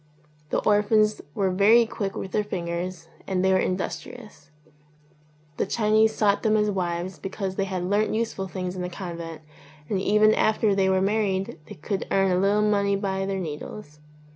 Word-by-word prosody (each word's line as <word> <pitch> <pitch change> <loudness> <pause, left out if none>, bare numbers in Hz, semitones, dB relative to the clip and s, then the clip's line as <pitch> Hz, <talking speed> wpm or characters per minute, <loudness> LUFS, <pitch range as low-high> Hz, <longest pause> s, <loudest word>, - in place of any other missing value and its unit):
The - - 0
orphans 215 0 +3
were 195 -2 +1
very 215 +5 +5
quick 200 -3 -4
with 190 - -5
their 210 - +1
fingers 175 -2 -4 0.2
and 185 -1 0
they 190 - +4
were 185 - +4
industrious; 190 -1 -5 1.1
the - - 0
Chinese 220 +1 +2
sought 205 -2 +2
them 215 -1 +2
as 210 0 +2
wives 175 -1 -3
because 195 0 -4
they 195 - 0
had 185 -2 -3
learnt 205 +4 +1
useful 220 -4 -2
things 185 0 -4
in 185 - -4
the 180 - -3
convent, 170 -3 -7 0.5
and 195 -2 0
even 215 +2 +4
after 215 -1 +2
they 195 -1 +2
were 190 0 +2
married 195 -4 0
they - - -9
could 195 +6 -4
earn 195 -1 +2
a 180 - +2
little 205 +2 +2
money 200 -1 +2
by 195 -1 -2
their 195 -1 -2
needles. 150 0 -7
195 Hz, 175 wpm, -25 LUFS, 185-210 Hz, 1.1 s, very